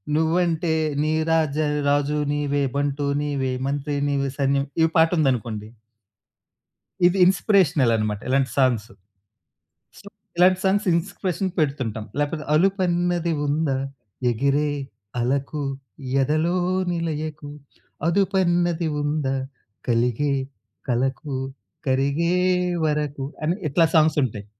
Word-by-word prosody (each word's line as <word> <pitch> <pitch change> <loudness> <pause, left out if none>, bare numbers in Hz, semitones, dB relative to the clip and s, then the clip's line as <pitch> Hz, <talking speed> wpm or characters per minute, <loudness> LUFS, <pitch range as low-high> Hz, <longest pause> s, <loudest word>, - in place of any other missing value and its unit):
నువ్వంటే 165 0 +1 0.3
నీ 155 +1 +1 0.2
రాజ 155 -3 +1 0.3
రాజు 145 +1 +1 0.2
నీవే 145 -1 0
బంటు 145 0 -1 0.2
నీవే 140 -3 -1 0.2
మంత్రి 145 +1 -2
నీవే 140 -1 0
సైన్యం 140 0 +1 0.2
ఈ - - +5
పాటుందనుకోండి 130 - +1 1.4
ఇది 180 +2 +3
ఇన్‌స్పిరేషనల్ 180 - +3
అనమాట 105 -1 -2
ఇలాంటి 135 -1 +2
సాంగ్సు. 120 -4 +2 1.1
సో - - -16 0.3
ఇలాంటి 185 +1 +5
సాంగ్స్ 195 +2 +2
ఇన్స్పిరేషన్ 185 +1 -2
పెడుతుంటాం. 130 -8 -1 0.2
లేపోతే 150 +1 -2
అలుపన్నది 175 -1 +1
ఉందా? 145 -2 0 0.5
ఎగిరే 140 +5 +1 0.5
అలకు 140 +4 -1 0.6
ఎదలోనిలయకు 165 -1 -1 0.6
అదుపన్నది 175 -3 +1
ఉందా? 145 -2 -1 0.5
కలిగే 120 +4 +1 0.6
కలకు 135 +4 -1 0.5
కరిగే 140 +6 +1 0.5
వరకు 150 -2 -1 0.2
అని 165 - +1
ఇట్లా 165 +4 +3
సాంగ్సుంటాయి. 145 -10 +2
150 Hz, 90 wpm, -23 LUFS, 135-170 Hz, 1.4 s, ఈ